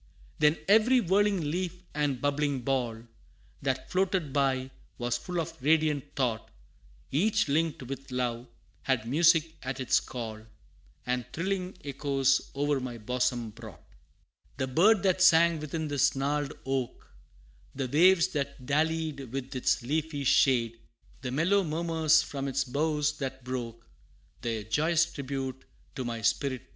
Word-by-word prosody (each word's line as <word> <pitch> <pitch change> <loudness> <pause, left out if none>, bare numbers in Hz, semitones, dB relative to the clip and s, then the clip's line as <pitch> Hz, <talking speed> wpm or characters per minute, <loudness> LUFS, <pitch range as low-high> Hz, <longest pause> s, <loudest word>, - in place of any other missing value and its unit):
Then 150 +1 +4
every 225 +5 +5
whirling 195 -5 +1
leaf 180 +1 -3
and 145 -3 0
bubbling 145 -1 0
ball, 120 -3 -1 0.6
That 130 -1 -2
floated 185 -6 0
by, 135 -2 +1 0.3
was 120 0 -1
full 175 +8 -3
of 160 - -5
radiant 150 -1 +1
thought; 120 -5 -1 0.6
Each 190 +9 +2
linked 155 0 0
with 135 +2 -7
love, 125 -1 -2 0.3
had 125 -4 0
music 165 +3 +4
at 130 +1 -4
its 130 - +3
call, 110 -3 -6 0.6
And 125 0 -1
thrilling 185 +1 -3
echoes 135 -1 +1
o'er 145 0 +1
my 125 -2 -5
bosom 120 0 -1
brought. 110 -7 -12 0.7
The 130 - 0
bird 190 - +4
that 185 -1 +2
sang 170 -2 +6
within 155 +1 -4
this 145 -2 +2
gnarled 145 +1 -1
oak, 135 -2 -3 0.7
The 135 -1 -2
waves 175 +6 +5
that 140 -5 -4
dallied 155 -2 -1
with 135 0 -5
its 130 -1 +1
leafy 150 +2 -2
shade, 120 -3 +3 0.4
The 125 - -4
mellow 170 +9 +2
murmurs 160 -1 +2
from 140 -1 -4
its 135 0 0
boughs 150 +2 -1
that 130 -2 -5
broke, 120 -3 -5 0.6
Their 115 -2 -2
joyous 155 +10 +2
tribute 135 -1 -4 0.3
to 130 - -4
my 115 -2 -4
spirit 130 +3 0
paid. 130 - -30
140 Hz, 140 wpm, -29 LUFS, 130-160 Hz, 0.7 s, sang